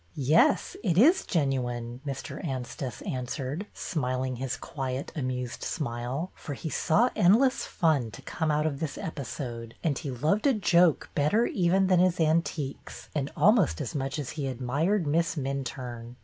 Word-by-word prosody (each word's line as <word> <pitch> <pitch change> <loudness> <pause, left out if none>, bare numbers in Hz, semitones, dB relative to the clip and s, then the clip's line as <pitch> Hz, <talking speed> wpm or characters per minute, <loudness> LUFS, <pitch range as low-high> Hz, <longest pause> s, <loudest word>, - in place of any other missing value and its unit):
" 85 - -34
Yes, 145 +3 +3
it 175 -6 +1
is 320 - +5
genuine," 125 - -1
Mr. 135 +6 -5
Anstice 130 -3 -4
answered, 135 +8 -4
smiling 130 -5 -2
his 130 0 -3
quiet 135 -1 -4
amused 125 -4 -3
smile, 135 +3 -3
for 145 - -7
he 160 - -5
saw 225 +10 +3
end 185 +5 +6
less 260 0 +2
fun 155 - +1
to 95 - -11
come 160 - -2
out 150 0 +2
of 145 -3 -1
this 160 -4 -3
episode, 120 -6 -5
and 155 -5 +1
he 150 - -5
loved 150 - +1
a 270 - +4
joke 175 -5 +3
better 180 +11 +3
even 190 -1 +2
than 185 -2 +4
his 180 -1 +3
antiques, 155 -3 -1
and 145 -2 -2
almost 180 - +4
as - - -4
much 135 +1 -2
as 145 -4 -4
he 145 -3 -3
admired 145 - 0
Miss 165 +3 +1
Minturne. 125 -4 -4
145 Hz, 165 wpm, -28 LUFS, 130-170 Hz, -, end